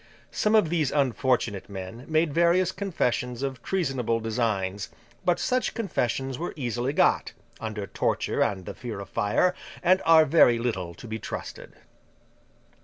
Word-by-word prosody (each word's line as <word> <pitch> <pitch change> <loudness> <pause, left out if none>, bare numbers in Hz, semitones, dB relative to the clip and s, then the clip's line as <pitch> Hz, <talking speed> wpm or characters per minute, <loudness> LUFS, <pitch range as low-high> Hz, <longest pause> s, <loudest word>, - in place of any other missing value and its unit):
Some 210 +1 +2
of 210 -7 +4
these 160 -5 +1
unfortunate 125 -7 0
men 95 +5 -7
made 155 -1 +1
various 170 +2 +3
confessions 125 - -2
of 135 -3 -3
treasonable 135 -11 -1
designs; 105 -4 -1 0.3
but, 175 -1 +2
such 255 0 0
confessions 135 - -2
were 175 - -3
easily 125 -2 -2
got, - - +2 0.3
under 110 -2 -4
torture - - -1
and 95 -3 0
the - - -6
fear 120 -5 -6
of 100 - -8
fire, 140 - +2 0.3
and 185 +2 +4
are 160 -1 +7
very 135 -6 +5
little 95 -8 -3
to 120 - -11
be 110 0 -4
trusted. - - -7
125 Hz, 145 wpm, -26 LUFS, 110-165 Hz, 0.3 s, are